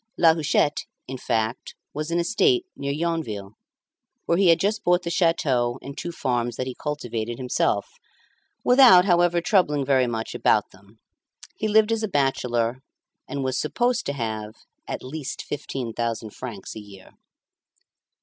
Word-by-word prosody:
La 165 -2 +6
Huchette, 150 -2 +1 0.2
in 130 0 -6
fact, 115 0 -2 0.2
was 155 +1 -4
an 170 - 0
estate 365 - +2
near 140 0 -3
Yonville, 145 -11 -3 0.7
where 170 +1 +2
he 195 - +4
had 165 -1 +5
just 210 +2 0
bought 180 0 +3
the 170 - -3
château 135 -9 +1
and 140 0 -8
two 175 - -5
farms 120 -6 -1
that 130 - -3
he 130 - -4
cultivated 120 -6 -4
himself, 125 -5 0 0.8
without, 245 -8 +7
however, 175 -2 +3
troubling 150 -7 +2
very 130 -2 +3
much 115 -1 -4
about - - +2
them. 100 +4 -20 0.6
He 215 - -2
lived 215 +1 +4
as 225 -1 0
a 220 - -1
bachelor, 125 - 0 0.5
and 140 0 -3
was 130 -1 -1
supposed 240 +10 0
to 140 - -1
have 110 -4 -4 0.3
"at - - -5
least 140 +2 -6
fifteen 130 -4 -5
thousand 115 -2 -3
francs 115 -6 -8
a - - -6
year." 100 -2 -14
140 Hz, 155 wpm, -24 LUFS, 120-170 Hz, 0.8 s, without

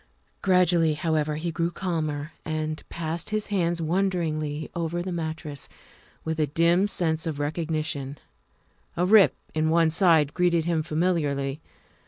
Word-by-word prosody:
Gradually, 175 -4 +3
however, 155 -1 0
he 165 +2 -3
grew 170 +1 -1
calmer 155 -4 -3
and 155 0 -3
passed 165 0 -4
his 215 0 -2
hands 175 -4 0
wonderingly 160 -4 -1
over 170 +1 -2
the 185 - -4
mattress, 160 -3 -5 0.6
with 160 0 -2
a 155 - +2
dim 170 +6 +3
sense 165 -4 0
of 155 -3 -3
recognition; 150 -2 -2 0.8
a 175 - +2
rip 200 0 +6 0.2
in 155 0 +1
one 165 0 +3
side 160 -4 +4
greeted 175 -2 +2
him 170 -2 +1
familiarly. 155 -4 -1
160 Hz, 135 wpm, -26 LUFS, 155-175 Hz, 0.8 s, rip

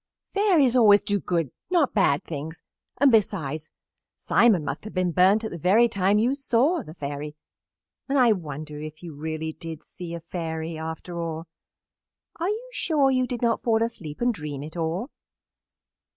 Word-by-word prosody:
"Fairies 350 - +3
always 210 -5 +6
do 205 -1 0
good, 165 -8 -1 0.2
not 340 -7 +2
bad 185 -9 +3
things, 160 +1 -7 0.3
and, 280 0 +5
besides, 160 - 0 0.5
Simon 205 -10 +3
must - - -4
have 215 - -9
been 185 -1 +1
burnt 190 +6 +4
at 220 - -4
the 170 - -6
very 205 +8 +5
time 200 -1 +2
you 235 +5 +2
saw 280 +4 +2
the 160 -8 -11
Fairy, 145 0 -5 0.7
and 280 - +2
I 245 -3 +6
wonder 150 -5 -4
if 155 +2 -9
you 170 -3 -7
really 160 +2 -4
did 165 -1 -8
see 170 -1 -8
a - - -5
Fairy, 165 -1 -4
after 160 +2 -6
all. 165 -1 -4 0.9
Are 345 +3 0
you 455 +4 -4
sure 290 - +2
you 255 -1 +1
did 245 -1 -4
not 235 -1 +2
fall 225 -1 +2
asleep 175 -9 -6
and 245 0 +2
dream 150 -6 -5
it 155 +3 -9
all?" 170 - -2
180 Hz, 170 wpm, -25 LUFS, 160-235 Hz, 0.9 s, always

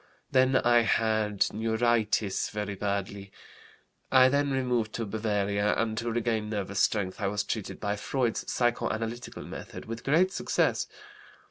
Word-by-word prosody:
Then 130 0 +4
I 120 -2 +5
had 110 -3 +1
neuritis 110 -2 +1
very 105 -1 -3
badly. 100 0 -3 0.8
I 130 -1 +7
then 140 +1 +1
removed 125 -5 0
to 115 - -2
Bavaria, 105 -1 0
and 110 -1 0
to 115 0 -2
regain 110 -2 -1
nervous 100 -2 -3
strength 100 -1 +1
I 100 - +1
was 105 +1 -1
treated 110 -1 -4
by 105 0 -2
Freud's 120 +1 -1
psychoanalytical 120 -1 -2
method, - - -8
with 115 +1 -6
great 170 +7 +3
success. - - 0
110 Hz, 135 wpm, -28 LUFS, 105-120 Hz, 0.8 s, I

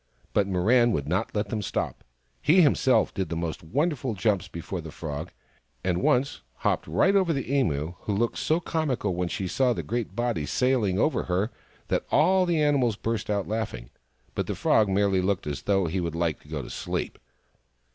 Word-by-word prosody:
But 100 -2 +2
Mirran 115 +6 +3
would 70 -4 -2
not 90 +7 -1
let 105 -1 -1
them 110 0 -2
stop. 100 - -3 0.4
He 175 +4 +5
himself 135 -3 +3
did 95 -5 -3
most 85 -1 -3
wonderful 135 - -1
jumps 100 0 +1
before 85 +2 -5
the 80 - -8
Frog, 75 +1 -6 0.5
and 90 -1 0
once 125 - +1
hopped - - -1
right 135 - +3
over 190 -4 +3
the 135 -3 -2
Emu, 80 - +1
who 105 - -2
looked 115 +3 0
so 160 +2 +1
comical 150 - -1
when 90 0 -1
she 95 +2 -3
saw 125 +6 +2
the - - -4
great 115 -5 -3
body 120 -11 -1
sailing 125 -8 +1
over 150 +9 +1
her 95 +5 0 0.4
that - - 0
all 185 +4 +4
the 170 -2 +2
animals 140 -7 +2
burst 115 0 -3
out 100 -2 0
laughing; 105 - -4 0.4
but - - -2
the - - -2
Frog 105 -2 +3
merely 95 -1 +2
looked 95 0 0
as 75 -2 -4
though 95 -2 +2
he 85 +3 -1
would 85 -2 -2
like 85 -3 0
to - - -21
go - - -4
to - - -9
sleep. - - -4
105 Hz, 190 wpm, -26 LUFS, 90-130 Hz, 0.5 s, He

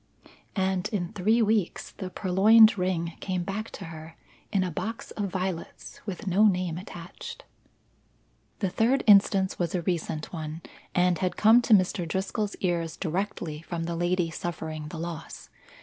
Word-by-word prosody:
And 190 -2 0
in 185 -3 -3
three 220 +4 +3
weeks 210 -4 0
the 190 -2 -6
purloined 215 +5 +6
ring 180 -3 -1
came 185 -2 -2
back 200 +4 -4
to - - -7
her, 160 0 -10 0.4
in 195 -3 +2
a 180 - -2
box 215 +8 -5
of 205 -2 -3
violets 185 -2 -5
with 200 +2 -5
no 200 +3 +4
name 180 -4 0
attached. 175 -2 -9 1.2
The 190 -3 0
third 245 +7 +2
instance 195 -2 +5
was 175 0 -1
a 175 - -1
recent 160 -2 -2
one, 160 0 -5 0.3
and 180 -1 +3
had 180 -2 -1
come 225 +3 +6
to 235 -2 +6
Mr. 185 -2 +1
Driscoll's 195 +4 -2
ears 170 -3 -1
directly 170 -3 -3
from 170 0 -4
the 170 0 -3
lady 175 0 0
suffering 155 -3 -5
the 160 - -7
loss. 170 0 -7
185 Hz, 155 wpm, -27 LUFS, 170-200 Hz, 1.2 s, purloined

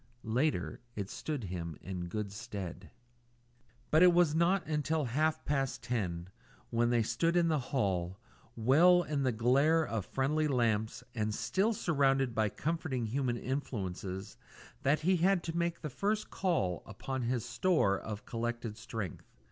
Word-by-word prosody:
Later, 110 - 0 0.2
it 100 -2 -4
stood 150 -6 -4
him 85 -5 -5
in 90 -2 -5
good 105 +2 -3
stead. 100 -4 -7 1.0
But 155 - +5
it 180 -1 +8
was 175 -4 +4
not 175 +4 +2
until 155 0 0
half 155 +6 0
past 135 -2 -1
ten, 90 -7 -2 0.4
when 120 0 +2
they 120 -1 +3
stood 165 +9 +1
in 170 -1 +3
the 155 -2 +2
hall, 95 - 0 0.4
well 165 +10 +5
in 150 -3 -2
the 130 -2 +2
glare 140 +8 +3
of 110 -7 -3
friendly 150 +3 +1
lamps 115 -5 0
and 110 -2 -1
still 195 +5 +1
surrounded 135 -7 +2
by 110 -2 +1
comforting 155 - -2
human 120 +1 -1
influences, 100 -7 -4 0.4
that 145 +3 +2
he 185 +3 +3
had 180 +1 +3
to 165 0 -4
make 170 0 -1
the 155 - -3
first 210 - -1
call 130 - 0
upon 120 +4 -4
this 120 -2 -1
store 155 - +2
of 105 -1 -6
collected 120 -2 -3
strength. 110 -6 -6
125 Hz, 150 wpm, -32 LUFS, 105-155 Hz, 1.0 s, it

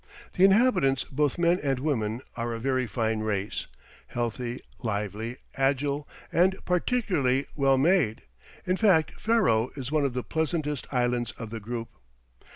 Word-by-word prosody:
The 185 - +2
inhabitants 195 - +4
both 145 0 0
men 175 +1 +3
and 135 -2 0
women 120 -5 -1
are 115 0 -2
a - - -5
very 130 0 0
fine 110 -1 -1
race, 105 -2 -2 0.4
healthy, 120 +1 -3 0.2
lively, 110 +2 -3 0.2
agile 140 +2 0 0.2
and 185 +3 +4
particularly 180 - +1
well 135 -2 +3
made, 145 - +2 0.4
in 185 +1 +1
fact 185 -8 +3
Ferro 130 - +3
is 135 -1 -5
one 155 -1 +2
of 135 -3 -1
the 125 - -1
pleasantest 155 -3 -2
islands 120 -2 0
of 115 -2 -8
the 115 - -4
group. 115 +2 -5
135 Hz, 145 wpm, -27 LUFS, 115-160 Hz, 0.4 s, inhabitants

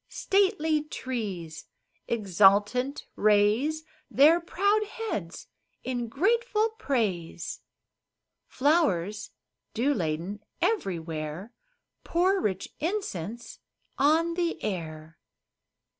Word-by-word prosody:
Stately 375 -6 +1
trees, 200 - -5 0.4
exultant, 210 +5 +3
raise 215 +10 +3 0.3
Their 310 +5 +6
proud 405 +5 +1
heads 405 - -5 0.4
in 245 -2 -2
grateful 440 - +1
praise; 190 -11 -2 0.9
Flowers, 255 - +1 0.5
dew 260 +6 +2
laden, 170 - -3 0.2
everywhere 170 - -2 0.5
Pour 370 +3 +2
rich 190 -2 -2
incense 240 - -4 0.4
on 320 +4 +3
the 340 -1 -1
air. 160 -5 -5
240 Hz, 75 wpm, -27 LUFS, -, 0.9 s, Their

